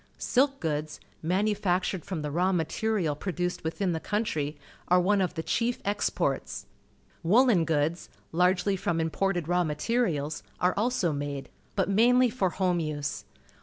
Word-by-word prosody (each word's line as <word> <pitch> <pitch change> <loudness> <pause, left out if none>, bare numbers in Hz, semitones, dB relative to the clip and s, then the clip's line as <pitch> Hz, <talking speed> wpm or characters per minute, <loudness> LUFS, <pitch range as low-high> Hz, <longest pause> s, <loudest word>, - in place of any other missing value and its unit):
Silk 275 +2 +2
goods, 155 -1 -3 0.2
manu 190 +6 +1
factured 185 -3 0
from 170 -6 -4
the 150 - -3
raw 180 +5 +2
material 175 0 0
produced 180 +2 -3
witliin 175 +3 -1
the 160 - -2
country, 160 -8 -2 0.3
are 180 +1 +5
one 195 +2 +3
of 180 -1 -1
the 160 - -3
cliief 240 +6 0
exports. 205 +1 -1 0.6
Woollen 205 0 +4
goods, 160 +2 0 0.2
largely 180 +3 +2
from 175 -3 -1
im 160 0 0
ported 185 -4 0
raw 180 +1 +2
materials, 155 -2 -1 0.2
are 180 +1 +3
also 215 -7 +1
made, 140 -1 -4 0.3
but 195 - +1
mainly 240 +4 +4
for 195 -6 +1
home 180 -1 0
use. 150 -3 -3
180 Hz, 150 wpm, -28 LUFS, 160-205 Hz, 0.6 s, are